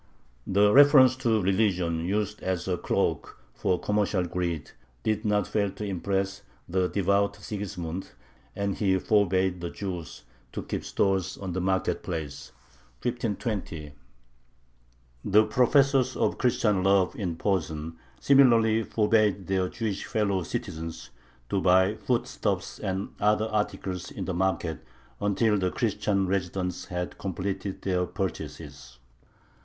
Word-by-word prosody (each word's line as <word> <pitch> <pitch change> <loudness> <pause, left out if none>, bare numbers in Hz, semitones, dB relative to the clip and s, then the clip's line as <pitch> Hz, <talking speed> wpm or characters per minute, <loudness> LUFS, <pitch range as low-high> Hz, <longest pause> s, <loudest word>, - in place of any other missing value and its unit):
The 105 +2 +4
reference 140 -3 +7
to 115 -4 +2
religion, 90 -4 +1
used 105 +2 -1
as 95 -2 -2
a 90 - +1
cloak - - -1 0.2
for 90 +8 0
commercial 105 -2 +1
greed, 85 -4 -3 0.3
did 110 0 0
not 105 -1 +2
fail 100 -2 0
to 105 - -5
impress 95 0 -2 0.3
the 90 +1 +1
devout 100 +1 +1
Sigismund, 95 -4 -5 0.5
and 100 -1 -1
he 95 -2 +1
forbade 95 -3 +2
the 85 - -3
Jews 90 -5 -6 0.3
to - - -4
keep - - -4
stores 95 -3 0
on 95 -3 -5
the 90 - -1
market 95 +1 0
place 80 -5 -5 0.5
(1520). 105 - -3 1.3
The 105 +2 +5
professors 130 +1 +3
of - - 0
Christian 105 -5 +2
love 95 +3 +3
in 95 -9 -3
Posen 80 -4 -2 0.2
similarly 115 -5 +5
forbade 105 -3 +2
their 95 -1 0
Jewish 105 -2 -3
fellow 100 -3 0
citizens 85 - -5 0.4
to 95 - 0
buy 95 +2 +4
foodstuffs 110 -5 -2
and 95 -1 -3
other 105 +1 +3
articles 100 -4 -2
in - - -6
the 95 - -2
market 85 -4 -1 0.4
until 105 +1 +2
the 95 -1 +1
Christian 100 +1 0
residents 90 -1 -2
had 90 0 -5
completed 95 +1 -4
their 90 -2 0
purchases. 65 -8 -6
95 Hz, 125 wpm, -27 LUFS, 90-105 Hz, 1.3 s, reference